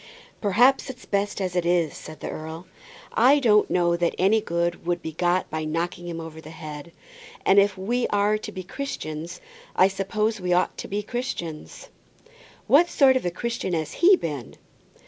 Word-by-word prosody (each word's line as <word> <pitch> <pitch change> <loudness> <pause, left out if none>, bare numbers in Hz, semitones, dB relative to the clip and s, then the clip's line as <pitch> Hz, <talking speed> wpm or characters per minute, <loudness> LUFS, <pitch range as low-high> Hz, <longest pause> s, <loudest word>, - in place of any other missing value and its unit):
"Perhaps 245 +8 +3
it's 255 -1 -9
best 205 0 -1
as 185 -2 -2
it 180 - +1
is," 170 -2 +1
said 155 0 -10
the - - -4
earl. 160 +3 -7 0.5
"I 255 +6 +5
don't 215 -7 +4
know 175 -1 +2
that 170 0 0
any 205 +4 +3
good 170 -3 -2
would 175 0 -1
be 160 - -4
got 175 +3 0
by 155 0 -2
knocking 170 +3 -3
him 170 -1 -5
over 160 -1 -8
the 155 - -11
head. 155 0 -9 0.5
And 195 - +6
if 200 -1 +2
we 235 +6 0
are 205 +1 +1
to 210 - -7
be 185 -2 -7
Christians, 170 - -6 0.3
I 185 - +6
suppose 210 +2 -1
we 180 0 +1
ought 180 +1 +1
to - - -5
be 205 +1 -3
Christians." 185 -10 -5 0.8
"What 340 +5 +5
sort 270 -5 +5
of 255 - 0
a - - +2
Christian 210 +1 -3
has 160 -2 -2
he 375 +3 +6
been?" 145 - -5
185 Hz, 185 wpm, -25 LUFS, 165-215 Hz, 0.8 s, And